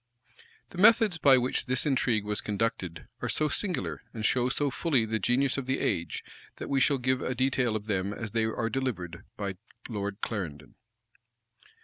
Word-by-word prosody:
The 180 - -8
methods 215 -4 +5
by 135 -3 +7
which 125 +1 0
this 130 0 +2
intrigue 120 -6 +1
was 105 0 -1
conducted 100 -5 -2 0.2
are - - -2
so 155 - +2
singular, 95 - -2
and 110 -1 -2
show 125 +1 +3
so 140 +2 0
fully 135 -5 +1
the 110 0 -1
genius 130 +6 +2
of 130 - -6
the 130 - +1
age, 85 0 -1 0.3
that - - -7
we 140 -1 +2
shall 140 +1 +3
give 130 0 +1
a 130 - -2
detail 125 -2 +1
of 105 -1 -3
them 100 -2 -1
as 105 0 -5
they 115 0 +1
are 110 +1 -1
delivered 105 -10 -3
by 100 -2 -3 0.3
Lord 100 -3 -4
Clarendon. 75 -9 -4
120 Hz, 175 wpm, -29 LUFS, 100-135 Hz, 0.3 s, by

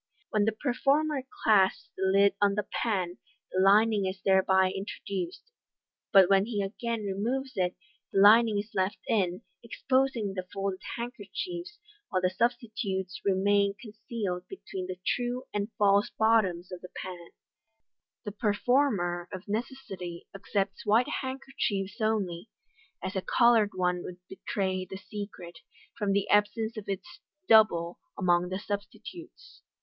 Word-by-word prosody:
When 210 -1 +2
the 220 - +3
performer 280 +5 +1 0.2
claps 195 -4 +3
the - - -8
lid 195 +1 +4
on 200 -1 +4
the 210 -1 -1 0.2
pan, 185 -6 -1 0.3
the 185 - 0
lining 205 +1 +4
is 190 +1 -4
thereby 190 -1 +4
introduced, 195 -2 -5 0.7
but 195 -3 +8
when 195 +1 +4
he 210 -4 -1
again 230 +3 -3
removes 240 +7 -2
it, 180 -1 0 0.4
the 195 - +1
lining 215 +1 +7
is 205 +2 -4
left 190 +1 0
in, 190 -3 0 0.2
exposing 250 -3 0
the 185 -1 -5
folded 195 -1 -3 0.2
handkerchiefs, 345 - -6 0.3
while 185 - +1
the 185 0 +1
substitutes 210 -4 -2
remain 200 +1 +2
concealed 215 -5 -5
between 190 - -7
the 185 -1 -5
true 245 +1 -1
and 205 +2 -2
false 200 0 +4
bottoms 200 -6 +2
of 180 - -7
the 180 - -10
pan. 175 -2 -7 1.0
The 205 - -3
performer, 205 -5 +1
of 185 0 -8
necessity, 205 -6 -5
accepts 195 0 -2
white 220 +4 +3
handkerchiefs 240 -6 -3
only, 210 -3 -1 0.5
as 190 - -4
a 190 - 0
coloured 230 -2 +4
one 180 -1 0
would 175 - -8
betray 190 -1 -2
the 190 +1 -8
secret, 190 -4 -8 0.4
from 205 -3 -1
the 200 0 +1
absence 220 +2 +2
of 215 -3 -7
its 345 - -5 0.3
"double" 180 -6 +5 0.2
among 180 -2 +2
the 185 - -2
substitutes. 220 - -8
200 Hz, 135 wpm, -29 LUFS, 190-225 Hz, 1.0 s, but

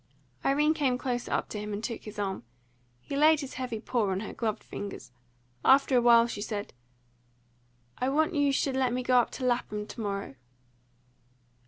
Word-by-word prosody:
Irene 295 +3 +3
came 275 -6 +1
closer 245 -1 -3
up - - 0
to 210 - -5
him 210 0 -5
and 205 +2 -4
took 230 -2 -4
his 215 0 -9
arm. 195 -7 -3 0.6
He 280 - -6
laid 305 +1 +5
his 275 - -7
heavy 250 -4 -4
paw 220 -2 0
on 190 +1 -1
her 215 - -6
gloved 220 -2 -2
fingers. 205 -10 -7 0.5
After 270 0 +5
a 245 - +5
while 235 -1 +6
she 225 -3 -5
said, 205 -1 -4 1.3
"I 255 - +1
want 315 +5 +2
you 285 -2 +2
should 270 0 0
let 260 -2 +1
me 250 0 -1
go 250 0 +4
up 240 - +1
to 255 - -4
Lapham 235 -4 -1
to 225 - -8
morrow." 200 -9 -4
245 Hz, 185 wpm, -29 LUFS, 210-270 Hz, 1.3 s, while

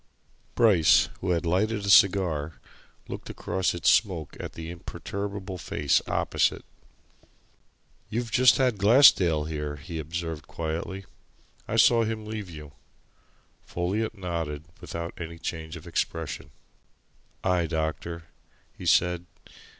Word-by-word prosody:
Bryce, 100 -9 +5
who 95 - -3
had 85 -1 +1
lighted 100 +5 0
a - - -1
cigar, 90 -7 +4 0.5
looked - - -7
across 95 -2 -1
its 85 - +3
smoke 90 -9 +1
at - - -6
the 80 +1 -7
imperturbable 100 +2 -6
face 70 -3 +1
opposite. - - 0 1.4
"You've 115 0 -3
just 125 -2 +5
had 125 -6 +1
Glassdale 100 - +6
here," 75 -2 -4
he 80 +3 -7
observed 80 -1 -5
quietly. 85 +4 -4 0.6
"I - - -2
saw 115 -1 +5
him 110 -1 -3
leave 105 -3 -6
you." 75 -3 -10 0.9
Folliot 105 +6 -2
nodded 85 -5 -4 0.2
without 85 0 -5
any 85 0 -6
change 80 0 -5
of 80 - -10
expression. 80 -4 -3 0.9
"Aye, 90 -2 +1
doctor," 80 +1 -3 0.5
he - - -7
said. 90 0 +2
85 Hz, 120 wpm, -27 LUFS, 80-100 Hz, 1.4 s, Glassdale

